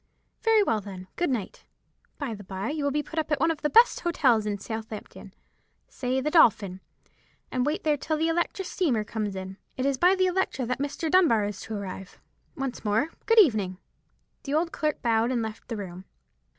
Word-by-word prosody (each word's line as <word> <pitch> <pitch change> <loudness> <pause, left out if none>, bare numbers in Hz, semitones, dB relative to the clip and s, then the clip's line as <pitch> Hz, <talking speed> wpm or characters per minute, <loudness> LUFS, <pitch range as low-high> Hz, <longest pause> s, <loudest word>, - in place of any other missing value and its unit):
"Very 450 -2 +4
well, 220 - 0
then. 190 -2 -9
Good 350 - 0
night! 235 -7 -3 0.5
By 280 -6 -3
the 205 -1 -9
bye, 190 +6 -4
you 300 -2 -2
will 290 +1 0
put 320 - -4
up 315 - -3
at 300 - +2
one 325 +3 +3
of 320 - -5
the 300 - +1
best 465 +7 +6
hotels 250 -11 +2
at 205 -1 -2
Southampton—say 225 +4 -7
the 300 +3 -1
Dolphin—and 220 - 0
wait 300 - -1
there 300 -2 +2
till 310 +2 -2
the 320 +1 +1
Electra 345 +3 -1
steamer 285 - 0
comes 210 -2 -3
in. 190 0 -6 0.2
It 260 - -1
is 275 -2 +1
by 365 +2 +5
the 370 -1 +2
Electra 365 -8 0
that 250 +2 -2
Mr. 290 +3 -2
Dunbar 300 - +4
is 205 -2 -5
to 220 - -5
arrive. 190 -2 -7 0.4
Once 270 -2 -4
more, 220 +8 +1 0.2
good 455 - +4
evening!" 215 - +4 0.6
The 280 +1 -2
old 335 +2 +1
clerk 305 -1 -2
bowed 230 0 +2
and 245 -3 0
left 220 -1 -7
the 230 - -4
room. 185 -2 -7
255 Hz, 190 wpm, -27 LUFS, 210-315 Hz, 0.6 s, best